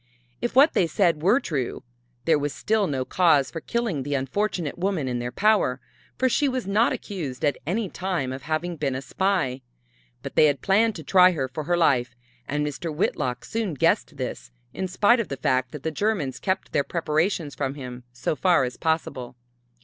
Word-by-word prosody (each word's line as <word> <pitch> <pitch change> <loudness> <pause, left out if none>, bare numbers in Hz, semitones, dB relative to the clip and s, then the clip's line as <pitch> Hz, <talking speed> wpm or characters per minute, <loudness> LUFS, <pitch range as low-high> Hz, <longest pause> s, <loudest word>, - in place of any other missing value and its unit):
If 240 - -2
what 280 +4 +6
they 175 - +3
said 165 -2 +2
were 200 - +4
true, 140 - -3 0.4
there 160 -3 +4
was 145 0 -3
still 215 -1 +1
no 130 -3 -2
cause 155 -7 +3
for 165 - -6
killing 230 - -2
the 145 +2 -2
unfortunate 160 +4 -2
woman 180 -7 0
in 125 -1 -2
their 120 0 -4
power, 200 -7 +2 0.4
for 260 - +2
she 280 +3 +2
was 255 -4 -2
not 210 +4 +3
accused 155 - -4
at 145 - +1
any 205 +5 0
time 175 -9 -2
of 135 - -7
having 160 +3 -2
been 135 -3 -1
a 130 - -3
spy. 180 -10 0 0.6
But - - -6
they - - +6
had 145 -1 -1
planned 215 +3 +3
to 160 - -7
try 185 +3 +6
her 135 -5 -2
for 135 +4 -6
her 175 +2 +1
life, 125 -7 +2 0.3
and 150 +1 -1
Mr. 150 +3 -4
Whitlock 125 -4 -1
soon 220 -8 -2
guessed - - +1
this, - - -5 0.2
in 190 - -3
spite 205 +6 +3
of 230 - -1
the 135 - -5
fact 130 0 0
that 150 - -8
the 160 - -1
Germans 165 - -1
kept 190 -1 -2
their 140 - +2
preparations 160 -1 -1
from 135 -1 -3
him 125 -3 -8
so 125 +4 -2
far 170 +1 +3
as 125 0 -4
possible. 145 -6 -2
160 Hz, 195 wpm, -25 LUFS, 135-195 Hz, 0.6 s, what